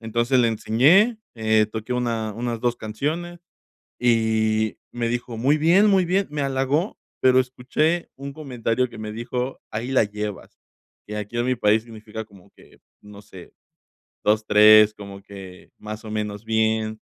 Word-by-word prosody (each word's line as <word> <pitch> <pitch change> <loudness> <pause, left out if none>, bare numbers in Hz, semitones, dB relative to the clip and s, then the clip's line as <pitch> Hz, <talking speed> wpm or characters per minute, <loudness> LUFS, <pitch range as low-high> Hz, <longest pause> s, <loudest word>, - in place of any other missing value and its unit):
Entonces, 120 +3 0
le 115 - +3
enseñé, 155 - +3 0.2
eh, 110 -1 +2
toqué 110 +3 -5
una 115 -3 -2
unas 115 -1 -3
2 120 -1 +1
canciones 150 +11 -4 0.6
y 110 -2 +1
me 120 -1 -2
dijo: 120 -1 -4
"Muy 140 +6 +2
bien, 170 +7 +4
muy 190 -2 +4
bien", 190 +3 0
me 150 -1 -3
halagó, 135 +7 -1 0.2
pero 130 0 +5
escuché 130 +7 -1
un 140 0 -7
comentario 125 -4 -2
que 115 - -12
me 105 0 -6
dijo: 125 +3 -4
"Ahí 115 +4 -4
la 130 - +4
llevas", 105 -2 -6 0.5
que 105 - -6
aquí 105 +3 -5
en 120 - 0
mi 130 0 +1
país 110 0 +2
significa 110 -1 -9
como 100 -4 -20
que, - - -21 0.2
no 105 0 -13
sé, 95 -3 -14 0.7
2 105 +1 +2
3 105 0 +7
como 100 -1 -10
que 95 -2 -12
más 110 +1 -8
o - - -7
menos 105 0 -4
bien. 110 -1 0
115 Hz, 160 wpm, -23 LUFS, 110-130 Hz, 0.7 s, 3